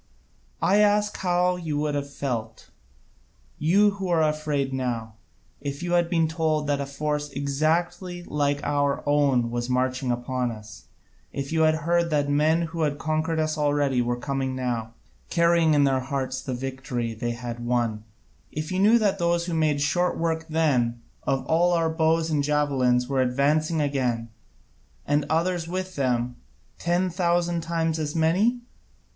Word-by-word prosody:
I 195 - +4
ask 210 0 +3
you - - -9
how 180 0 +2
you 160 -4 -3
would 150 0 -1
have 140 0 -2
felt, 115 -6 -5 0.9
you 200 +7 +4
who 195 -1 -5
are 165 -2 +3
afraid 150 -3 -1
now, 120 -4 -3 0.5
if 140 +2 -5
you 175 - -2
had 175 -1 +3
been 165 -2 +2
told 155 -1 0
that 145 -1 0
a 140 - -4
force 150 +1 -2
exactly 165 +6 -1
like 145 -2 -1
our 145 0 0
own 140 -5 +2
was 120 +1 -3
marching 130 +1 0
upon 125 +1 -1
us, 110 -1 -10 0.5
if 140 +1 -5
you 160 0 +1
had 155 0 +4
heard 170 0 +2
that 145 -2 +1
men 155 +3 +3
who 165 0 -4
had 145 -2 0
conquered 155 +1 -1
us 155 0 -1
already 145 -3 +2
were 120 0 -1
coming 135 0 -2
now, 120 -3 -3 0.3
carrying 170 -2 +3
in 145 - +4
their 135 -1 +2
hearts 130 0 -3
the 130 - -4
victory 125 -2 -4
they 120 +2 -3
had 120 0 -6
won, 120 -3 0 0.5
if 155 +2 -4
you 185 - -1
knew 215 +4 +6
that 200 -3 +1
those 170 0 +1
who 175 - -3
made 155 -3 +1
short 175 +5 +1
work 160 -1 -1
then 130 -7 +1 0.3
of 135 -1 0
all 175 +2 +3
our 165 -1 +1
bows 160 0 +1
and 145 -2 +1
javelins 135 -4 +2
were 135 -1 +1
advancing 150 +5 +1
again, 125 -6 -1 0.8
and 145 0 +1
others 165 +1 0
with 185 +1 -4
them, 125 -2 0 0.4
ten 175 +2 +1
thousand 175 -1 +1
times 165 -1 -1
as 150 0 -3
many? 190 +10 +2
150 Hz, 165 wpm, -25 LUFS, 130-165 Hz, 0.9 s, knew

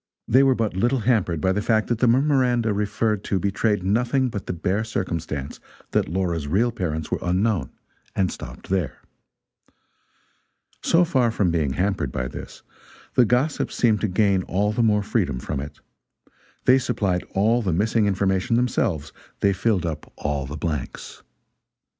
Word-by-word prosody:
They 130 +4 +5
were 135 -1 +4
but 110 -5 -1
little 120 +6 +1
hampered 105 -8 +1
by 95 - +2
the 105 +2 0
fact 110 +1 +2
that 120 -2 0
the 125 - +3
memoranda 125 -3 +3
referred 105 0 -1
to 100 - 0
betrayed 100 +1 0
nothing 125 +6 +1
but 100 -4 -6
the - - -1
bare 95 +5 -1
circumstance 85 -9 -4 0.3
that - - +1
Laura's 85 -4 -1
real 110 +10 +2
parents 80 -8 -3
were - - 0
unknown, 95 +2 0 0.5
and 95 -2 +1
stopped - - -9
there. 95 -4 -1 1.8
So 170 +1 +4
far 130 -7 +2
from 100 -6 +1
being 75 -5 0
hampered 90 -6 -1
by - - -2
this, - - -9 0.5
the 125 - +5
gossips 130 +7 0
seemed 110 -3 +2
to 110 - +1
gain 95 0 +2
all 100 +3 0
the 115 - 0
more 105 -2 +3
freedom 95 - 0
from 70 +3 -4
it. 70 +1 -8 0.9
They 130 +1 +6
supplied 100 -8 -1
all 110 +5 +3
the 95 -5 -1
missing 105 +5 +2
information 95 +2 +1
themselves, 105 - 0 0.3
they 100 -1 +3
filled 95 -2 0
up 80 -3 -5
all 70 -2 -2
the 75 +3 -6
blanks. 75 -3 -5
100 Hz, 160 wpm, -23 LUFS, 90-115 Hz, 1.8 s, They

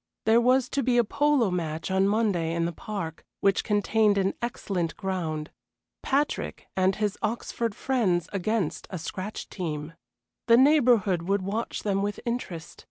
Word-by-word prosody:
There 225 +2 +5
was 255 +1 +3
to 280 - 0
be 250 -2 +2
a 240 - +6
polo 280 -2 +2
match 165 -1 -3
on 190 +1 +3
Monday 200 -6 +1
in 170 0 +1
the 170 - -1
park, 170 -4 -6 0.2
which 195 -1 +2
contained 210 0 +2
an 195 0 +1
excellent 190 -8 -2
ground 165 -6 -3 0.5
Patrick 285 +2 -1
and 190 0 +2
his 210 -1 -2
Oxford 230 0 -2
friends 200 -10 +1
against 200 -2 -1
a 185 - -4
scratch 185 +5 -5
team. 155 -4 -5 0.5
The 230 0 +7
neighborhood 245 - +4
would 200 -1 +1
watch 215 +5 -3
them 195 -2 +1
with 205 +1 -2
interest. 235 -9 -4
200 Hz, 155 wpm, -27 LUFS, 180-230 Hz, 0.5 s, The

